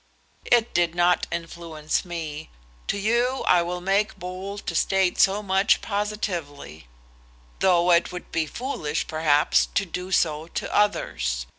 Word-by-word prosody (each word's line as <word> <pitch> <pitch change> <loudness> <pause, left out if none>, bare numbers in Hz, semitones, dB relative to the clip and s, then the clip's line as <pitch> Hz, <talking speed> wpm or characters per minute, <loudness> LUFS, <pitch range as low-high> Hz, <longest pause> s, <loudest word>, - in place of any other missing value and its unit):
"It 240 -1 +2
did 175 -1 +1
not 175 0 +2
influence 165 -2 -3
me. 160 -3 -6 0.4
To - - -1
you 240 +5 +1
I 180 - +5
will 175 +1 -4
make 200 +4 0
bold 185 +3 -7
to - - -3
state 190 -2 +1
so 200 +2 +3
much 195 +1 +3
positively, 175 - -4 0.7
though 180 -1 +3
it 170 0 +3
would 180 0 -8
be 160 -1 0
foolish, 165 - -3
perhaps, 155 -2 +2
to 200 - +2
do 180 +1 -6
so 155 -3 +1
to - - -4
others. - - 0
180 Hz, 140 wpm, -24 LUFS, 160-200 Hz, 0.7 s, I